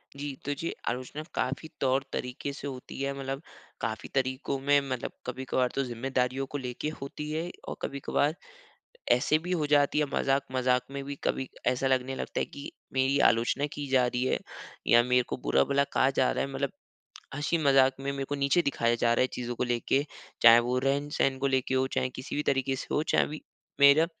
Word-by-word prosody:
जी, 140 -1 -5
तो 145 - 0
जी 165 +4 -3 0.2
आलोचना 130 +5 -3
काफ़ी 140 +5 -2
तौर-तरीके 130 0 -1
से 140 0 -6
होती 130 0 -7
है 140 0 -1
मतलब 135 +1 -4 0.4
काफ़ी 110 -1 -3
तरीकों 130 +1 0
में 145 +1 +4
मतलब 130 -2 -3
कभी-कभार 130 0 -1
तो 135 - +1
जिम्मेदारियों 125 +2 -1
को 145 - -5
लेके 130 +3 -4
होती 150 +2 -6
है, 165 +3 -2 0.2
और - - -4
कभी-कभार 140 +2 0 0.8
ऐसे 135 +5 +4
भी 180 - -3
हो 160 -4 +1
जाती 145 0 +3
है 150 - +3
मज़ाक-मज़ाक 130 -2 +1
में 140 0 -4
भी 140 0 -5
कभी 130 - -1 0.2
ऐसा 130 +1 +2
लगने 130 0 +1
लगता - - -3
है - - +1
कि 140 - -9 0.2
मेरी 135 +1 +2
आलोचना 120 +5 +1
की 145 -1 -5
जा 130 -2 +5
रही 125 0 -1
है, - - +1 0.5
या 120 0 +6
मेरे 125 0 +3
को - - -2
बुरा-भला 140 +2 +2
कहा 130 - +4
जा 130 -1 +2
रहा - - -1
है 135 - -8
मतलब 135 0 -1 0.6
हँसी-मज़ाक 140 -3 +3
में 140 0 -2
मेरे 135 0 -3
को 145 - -4
नीचे 140 +5 +2
दिखाया 120 -4 +1
जा 120 0 +2
रहा - - +1
है 130 - +4
चीज़ों 120 0 -4
को 125 - 0
लेके। 125 +3 +1 0.4
चाहे 115 0 +10
वो 125 +1 0
रहन-सहन 135 0 0
को 140 - 0
लेके 130 -1 +1
हो 130 0 +2
चाहे 130 - +1
किसी 130 +3 -6
भी 150 - +1
तरीक़े 135 -1 +1
से - - -6
हो 150 - +2
चाहे - - +2
भी 155 +1 -7 0.4
मेरा 140 +3 +7
135 Hz, 195 wpm, -29 LUFS, 125-140 Hz, 0.8 s, चाहे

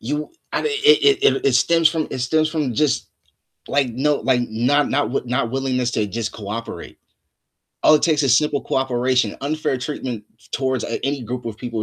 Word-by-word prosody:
you 150 +6 -3 0.2
I - - 0
mean, 455 - -1
it 420 -2 +5
it 430 - +4
it 400 - -2
it - - +4
stems 165 -1 +4
from 160 -1 -2
it - - -4
stems 155 +5 +1
from 150 -6 -2
just, 150 +4 0 0.6
like, 140 -2 +1
no 140 +5 +1
like, 130 -3 +1
not 125 +7 +1
not 145 +1 +1
w - - 0
not 125 -1 -1
willingness 130 -1 -1
to 110 -2 0
just 110 +2 -4
cooperate. 110 +2 -7 0.8
All 155 - +6
it 150 - +2
takes 155 -3 +2
is 130 -3 +4
simple 145 -1 0
cooperation. 125 -3 0
Unfair 150 -1 -1
treatment 125 -4 -5
t - - -22
towards 130 -3 -1
a 115 - -4
any 140 -1 -1
group 125 +2 -5
of 115 -2 -5
people, 115 -2 -4
130 Hz, 200 wpm, -21 LUFS, 120-150 Hz, 0.8 s, All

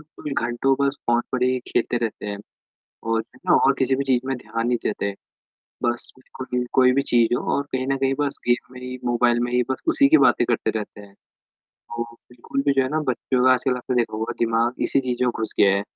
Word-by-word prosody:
देखो 150 -1 -9
घंटों 120 +3 +1
बस 140 0 +1
फ़ोन 120 0 +3
पर 125 -1 0
ही 130 0 +1
खेलते 120 - 0
रहते 105 - -8
हैं 100 0 -4 0.7
और 115 - +2
जो - - -10
है - - +1
ना - - +5
किसी 130 0 +2
भी 140 - -1
चीज़ 130 -2 +2
में 135 - -1
ध्यान 115 -1 -4
नहीं 120 -1 +1
देते। 100 -1 -2 0.7
बस 120 0 -1
बिल्कुल 130 -1 -4
कोई 130 -1 +5
भी 140 - +2
चीज़ 120 -1 +4
हो - - -3
और 140 - +1
कहीं 130 0 -1
न 135 0 +1
कहीं 135 0 +1
बस 145 -1 -1
गेम 120 +1 +1
में 125 - -10
ही 125 0 -6
मोबाइल 120 0 +2
में - - -5
ही 125 0 +3
बस 130 - -2
उसी 285 -4 +5
की 320 - +7
बातें 120 - +4
करते 115 -2 0
रहते 105 -1 -6
हैं। 100 -1 -14 0.6
तो 120 0 -7 0.3
बिल्कुल 120 +3 -4
भी 140 - +4
जो - - +6
है - - -1
ना 155 - 0
बच्चों 125 0 0
का 130 - +7
आजकल 130 0 0
आपने 125 +1 -3
देखा 115 -2 0
हुआ 110 - -2
है - - -2
दिमाग 115 +1 +1
इसी - - +2
चीज़ों 125 0 0
में - - +2
घुस 110 - -2
गया 100 - +6
है। 100 - 0
125 Hz, 240 wpm, -23 LUFS, 120-130 Hz, 0.7 s, की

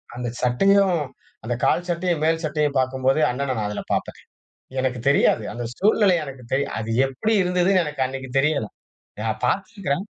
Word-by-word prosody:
அந்த 125 0 -4
சட்டையும், 190 +8 +3 0.4
அந்த 115 +2 -2
கால் 175 +1 +2
சட்டையும், 175 -2 -1
மேல் 160 0 +1
சட்டையும் 150 -2 0
பாக்கும்போது, 130 +2 +1
அண்ணன 135 +1 -2
நான் 105 -1 -1
அதில 105 - -4
பாப்பேன். - - -3 0.6
எனக்குத் 125 -2 -2
தெரியாது. 140 -5 +3
அந்த 120 0 -5
சூழ்நிலை 205 -1 +4
எனக்கு 135 -3 -9
தெரியா. 135 +1 +1
அது 110 +1 -4 0.2
எப்படி 135 - -2
இருந்ததுன்னு 180 +1 +2
எனக்கு 150 -3 -3
அன்னைக்கு 135 0 -6
தெரியல. 140 -4 +1 0.5
நான் 110 0 -2
பாத்திருக்கிறேன். 190 - -1
140 Hz, 155 wpm, -23 LUFS, 130-180 Hz, 0.6 s, சூழ்நிலை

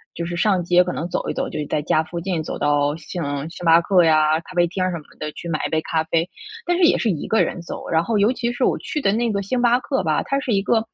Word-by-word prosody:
就 170 - -3
是 175 +1 -4
上 190 +1 +2
街 175 +1 +4
可 180 - -3
能 165 - -3
走 - - -2
一 - - -1
走， - - -2
就 - - -5
在 150 - 0
家 155 +1 +1
附 170 +2 -6
近 170 -2 -2
走 - - -5
到 145 0 +1
星 165 +2 -6 0.3
星 175 - -10
巴 165 0 +7
克 180 0 +4
呀， 155 -1 +4
咖 185 - -13
啡 175 0 +4
厅 185 +2 -3
儿 185 - +1
什 170 - -3
么 155 - -11 0.2
的 155 0 -4
去 - - -8
买 155 - -1
一 - - -10
杯 160 - +1
咖 160 0 -1
啡。 165 +1 0 0.4
但 350 - +1
是 365 - +2
也 335 - +5
是 230 - 0
1 160 - -4
个 220 - +3
人 180 - -4
走， 170 - -7
然 160 0 +2
后 225 +4 0
尤 210 +5 +3
其 240 -2 -2
是 245 +2 -2
我 - - +1
去 300 - -4
的 195 - +2
那 230 +1 0
个 200 -1 -1
星 245 +6 -1
巴 245 0 +4
克 265 +1 -2
吧， - - +1
它 275 - -1
是 265 - -3
一 195 - +2
个 225 +2 +1
175 Hz, 325 characters per minute, -21 LUFS, 160-220 Hz, 0.4 s, 巴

